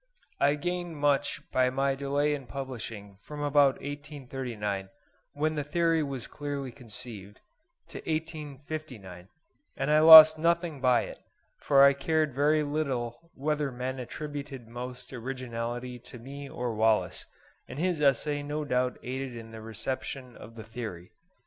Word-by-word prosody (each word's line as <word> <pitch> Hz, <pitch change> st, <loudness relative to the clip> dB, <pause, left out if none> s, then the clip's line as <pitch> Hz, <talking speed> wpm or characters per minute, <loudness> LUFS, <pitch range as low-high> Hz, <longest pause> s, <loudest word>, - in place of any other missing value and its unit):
I 145 Hz, +1 st, +4 dB
gained 175 Hz, +1 st, -3 dB
much 145 Hz, -1 st, +1 dB
by 130 Hz, 0 st, +3 dB
my 135 Hz, +1 st, +1 dB
delay 140 Hz, +2 st, 0 dB
in 140 Hz, -4 st, -5 dB
publishing 115 Hz, -7 st, -7 dB
from 150 Hz, +8 st, -9 dB
about 145 Hz, -2 st, +4 dB
1839, 130 Hz, -9 st, -5 dB, 0.4 s
when 155 Hz, +2 st, 0 dB
the 150 Hz, -2 st, -2 dB
theory 165 Hz, +2 st, +1 dB
was 135 Hz, -5 st, -4 dB
clearly 140 Hz, -3 st, -5 dB
conceived, 110 Hz, -5 st, -8 dB, 0.5 s
to -, -, -7 dB
1859; 145 Hz, -, -6 dB, 0.5 s
and 135 Hz, +2 st, 0 dB
I 155 Hz, -, +6 dB
lost 155 Hz, 0 st, +11 dB
nothing 170 Hz, -3 st, +1 dB
by 125 Hz, -2 st, +4 dB
it, -, -, -9 dB, 0.4 s
for 140 Hz, -1 st, +5 dB
I 140 Hz, 0 st, +8 dB
cared 155 Hz, +1 st, 0 dB
very 150 Hz, +3 st, +3 dB
little 140 Hz, -2 st, -3 dB
whether 150 Hz, 0 st, -1 dB
men 130 Hz, +1 st, -4 dB
attributed 140 Hz, -1 st, -6 dB
most 125 Hz, +2 st, -7 dB
originality 125 Hz, -1 st, -5 dB
to 125 Hz, +1 st, -12 dB
me 140 Hz, +4 st, -9 dB
or 120 Hz, -3 st, -3 dB
Wallace; 110 Hz, 0 st, +1 dB, 0.4 s
and -, -, -8 dB
his 170 Hz, -1 st, 0 dB
essay 145 Hz, +1 st, +2 dB
no 150 Hz, +1 st, -3 dB
doubt 125 Hz, -2 st, 0 dB
aided 130 Hz, 0 st, -4 dB
in 115 Hz, -1 st, -9 dB
the 110 Hz, 0 st, -9 dB
reception 125 Hz, +3 st, -5 dB
of 115 Hz, -, -12 dB
the 110 Hz, -, -8 dB
theory. 110 Hz, -6 st, -7 dB
135 Hz, 145 wpm, -29 LUFS, 120-150 Hz, 0.5 s, lost